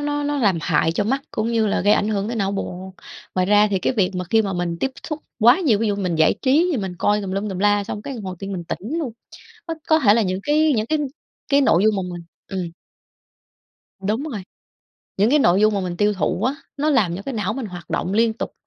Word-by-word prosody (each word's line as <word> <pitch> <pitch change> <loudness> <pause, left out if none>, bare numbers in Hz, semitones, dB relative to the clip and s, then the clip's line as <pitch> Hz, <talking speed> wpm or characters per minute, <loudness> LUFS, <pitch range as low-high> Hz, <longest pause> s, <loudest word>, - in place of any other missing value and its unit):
nó 290 0 -1
nó 290 0 -1
làm 200 -9 +2
hại 165 -1 +1
cho 205 - 0
mắt 270 +6 0
cũng 215 +1 -2
như 225 -1 +2
là 200 - +1
gây 205 +2 +4
ảnh 205 - +2
hưởng 205 -2 -1
tới 235 - -3
não 200 -2 0
bộ. 190 -1 -5 0.4
Ngoài 185 -1 +1
ra 210 +1 +5
thì 195 - +1
cái 220 - 0
việc 200 -6 +1
mà 180 - -2
khi 220 +5 +3
mà 195 - -2
mình 175 -2 -2
tiếp 270 - 0 0.2
xúc 305 -2 -3 0.2
quá 240 - +6
nhiều, 245 - +3
ví 225 - 0
dụ 205 - 0
mình 185 -4 -1
giải 160 0 +4
trí 290 +7 +3
thì - - 0
mình 190 -5 -3
coi 210 0 +2
tùm 195 - -5
lum 200 +2 -2
tùm 190 -2 -4
la, 205 +1 +2
xong 205 - -6
cái 275 - -6
hồi 190 -6 -6
tự 195 - -6
nhiên 200 - -5
mình 175 -3 -5
tỉnh 225 - -4
luôn, 285 -8 -3 0.6
c - - -3 0.2
có 315 0 +4
thể 210 -8 +5
là 230 - +3
những 185 -2 -1
cái 305 +1 +3
những 215 -1 0
cái 310 - +1 0.5
cái 280 0 +4
nội 185 -8 +4
dung 215 -1 +3
mà 195 - -1
mình 175 - -8 0.2
ừm. 185 -3 -4 1.3
Đúng 215 +7 -1
rồi. 255 -10 -5 0.8
Những 205 +4 +3
cái 300 - +5
nội 185 -8 +4
dung 215 0 +4
mà 200 - 0
mình 180 -2 -4
tiêu 205 +3 +2
thụ 190 0 -1
á, 255 +4 +1 0.2
nó 300 +2 +1
làm 200 - +2
cho 195 - -7
cái 270 +4 -5
não 210 -4 -1
mình 265 -4 -4
hoạt 175 -3 -10
động 185 - -1
liên 225 +2 +3
tục 220 - -5
205 Hz, 265 wpm, -21 LUFS, 190-250 Hz, 1.3 s, quá